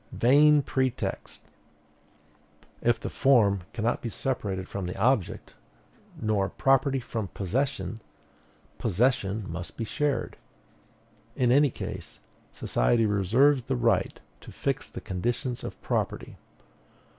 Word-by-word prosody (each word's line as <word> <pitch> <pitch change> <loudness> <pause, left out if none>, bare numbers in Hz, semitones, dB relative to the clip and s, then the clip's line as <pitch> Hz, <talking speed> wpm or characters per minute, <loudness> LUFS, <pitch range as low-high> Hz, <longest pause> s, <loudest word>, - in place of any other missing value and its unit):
Vain 145 +4 +5
pretext! 130 -1 -2 1.4
If 120 -1 +2
the - - -5
form 115 -8 +4
cannot 115 0 -1
be 120 - -3
separated 100 -7 -3
from 100 -3 -4
the 90 - -5
object, 115 -3 0 0.7
nor 105 -3 0
property 135 +4 +2
from 115 -4 -4
possession, 115 +4 -2 0.8
possession 110 -1 +1
must 85 +1 -6
be 115 - -2
shared; 145 +4 -1 1.0
in 125 -2 +2
any 145 +2 +5
case, - - -7 0.3
society 115 - +1
reserves 115 +7 +3
the 135 - -1
right 115 -6 +1 0.2
to - - -12
fix - - -2
the - - -8
conditions 120 +6 -3
of - - -7
property. - - -2
115 Hz, 110 wpm, -27 LUFS, 100-130 Hz, 1.4 s, Vain